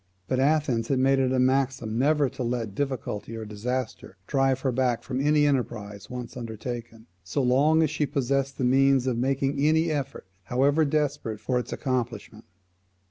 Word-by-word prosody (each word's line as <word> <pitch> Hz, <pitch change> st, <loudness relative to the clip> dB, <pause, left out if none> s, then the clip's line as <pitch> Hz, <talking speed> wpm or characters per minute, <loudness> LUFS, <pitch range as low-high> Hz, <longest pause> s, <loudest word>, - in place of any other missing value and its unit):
But 130 Hz, -, 0 dB
Athens 135 Hz, -5 st, +2 dB
had 135 Hz, -, +1 dB
made 135 Hz, +1 st, +3 dB
it 130 Hz, -1 st, +2 dB
a 130 Hz, -, +1 dB
maxim 130 Hz, -3 st, +1 dB
never 145 Hz, +1 st, +3 dB
to 135 Hz, +1 st, -8 dB
let 120 Hz, -4 st, -2 dB
difficulty 115 Hz, -4 st, -3 dB
or 110 Hz, -, -6 dB
disaster 110 Hz, -1 st, -4 dB
drive 135 Hz, 0 st, +1 dB
her 130 Hz, -, 0 dB
back 125 Hz, -1 st, 0 dB
from 130 Hz, 0 st, -3 dB
any 150 Hz, +1 st, +3 dB
enterprise 105 Hz, -7 st, -2 dB
once 125 Hz, -1 st, -7 dB
undertaken, 115 Hz, -1 st, -6 dB, 0.2 s
so 95 Hz, +10 st, -1 dB
long 145 Hz, +6 st, +4 dB
as 155 Hz, -, 0 dB
she 150 Hz, -1 st, 0 dB
possessed 135 Hz, -1 st, -1 dB
the -, -, -2 dB
means 135 Hz, +1 st, +4 dB
of 130 Hz, -2 st, 0 dB
making 135 Hz, +3 st, 0 dB
any 160 Hz, +2 st, +3 dB
effort, 140 Hz, -6 st, -4 dB, 0.2 s
however 140 Hz, +5 st, +2 dB
desperate, 145 Hz, -7 st, -1 dB
for 125 Hz, +4 st, 0 dB
its 125 Hz, -, -6 dB
accomplishment. 115 Hz, -5 st, -3 dB
130 Hz, 170 wpm, -26 LUFS, 120-140 Hz, 0.2 s, long